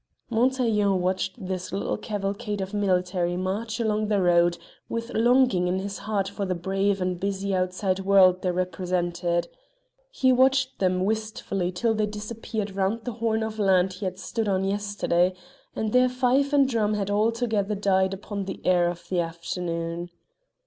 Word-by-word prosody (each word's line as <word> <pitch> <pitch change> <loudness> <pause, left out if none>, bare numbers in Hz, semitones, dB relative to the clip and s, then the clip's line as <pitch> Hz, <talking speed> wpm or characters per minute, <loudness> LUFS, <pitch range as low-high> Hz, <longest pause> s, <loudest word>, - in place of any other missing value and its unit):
Montaiglon 225 -5 +2
watched 185 +1 -1
this 185 -1 -4
little 200 - -1
cavalcade 205 +1 -3
of 190 +1 -4
military 180 -3 0
march 210 +5 -3
along 215 -2 0
the 205 -1 +2
road, 175 -1 +3 0.3
with 230 +1 -4
longing 240 -5 +3
in 180 +1 0
his 200 +1 -4
heart 205 -3 -1
for 200 +1 -4
the 185 -2 -1
brave 195 +3 0
and 180 -1 -1
busy 195 0 -2
outside 185 +1 0
world 190 -1 +5
they 185 - 0
represented. 175 -1 -1 0.6
He 265 - +2
watched 260 +1 +3
them 185 -1 +1
wistfully 215 -4 -2
till 225 +5 0
they 215 -1 +1
had 210 - -6
disappeared 210 -1 -5
round 200 +4 0
the 245 - -2
horn 220 -1 +1
of 220 0 -5
land 190 -2 +3
he 190 +2 -6
had 185 0 -3
stood 220 +3 -3
on 190 -1 +1
yesterday, 195 -3 0 0.4
and 220 -1 -2
their 250 0 +5
fife 255 +3 +2
and 280 -2 +4
drum 215 -4 +1
had 200 -1 -2
altogether 215 -1 +1
died 190 -1 +2
upon 200 0 -5
the 190 - -6
air 175 -1 +4
of 175 0 -8
the 180 - 0
afternoon. 170 0 -3
195 Hz, 165 wpm, -25 LUFS, 185-220 Hz, 0.6 s, world